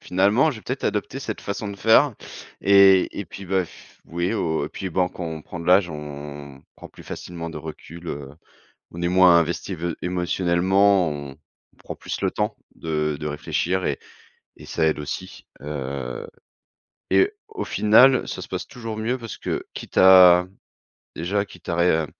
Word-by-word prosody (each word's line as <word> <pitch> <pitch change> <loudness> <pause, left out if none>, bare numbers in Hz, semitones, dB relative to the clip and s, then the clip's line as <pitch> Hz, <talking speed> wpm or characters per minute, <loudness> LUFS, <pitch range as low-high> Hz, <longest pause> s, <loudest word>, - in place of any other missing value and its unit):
«Finalement 100 +11 +3
je 130 - -7
vais - - -14
peut-être 130 +2 -4
adopter 105 +6 -2
cette 110 -6 -5
façon 100 +1 -4
de 100 - -7
faire» 115 +6 +4 0.5
et 100 -1 +5
et 100 - -3
puis, 100 +1 -10
bah 95 0 +1
f - - -18
oui 85 +5 -2
au 80 -7 -1
et - - -7
puis, 95 +2 -6
ben, 90 +2 +1
quand 90 - -7
on 80 -1 -5
prend 85 - -8
de 85 - -8
l'âge, 90 0 +5
on 75 -2 -8
prend - - -11
plus - - -15
facilement 85 -1 -7
de - - -8
recul, 85 +2 -9
heu, 70 -1 -6 0.6
on 85 - -7
est 85 - +1
moins 90 -1 +6
investi 85 +3 -1
vé 85 0 -3
émotionnellement, 90 +1 +2
on 70 -1 -7 0.4
on - - -31
prend - - -8
plus - - -6
le - - +1
temps - - -2 0.2
de 75 -2 -2
de 75 - -4
réfléchir 85 +5 -2
et 70 - -1 0.6
et - - -12
ça 80 - 0
aide 80 -1 +1
aussi, 75 - -7 0.2
heu 70 -4 -5 0.8
et 405 +2 +4 0.2
au 435 -2 -5
final, 125 +5 +5
ça - - -5
se - - -7
passe - - -4
toujours 115 -3 -7
mieux 120 +4 -2
parce 115 -3 -8
que, - - -4
quitte - - -5
à 90 -1 +8 0.7
déjà 100 +5 -1
quitte 90 -4 -16
à 85 - -1
ré 80 -2 +2
90 Hz, 185 wpm, -23 LUFS, 80-100 Hz, 0.8 s, à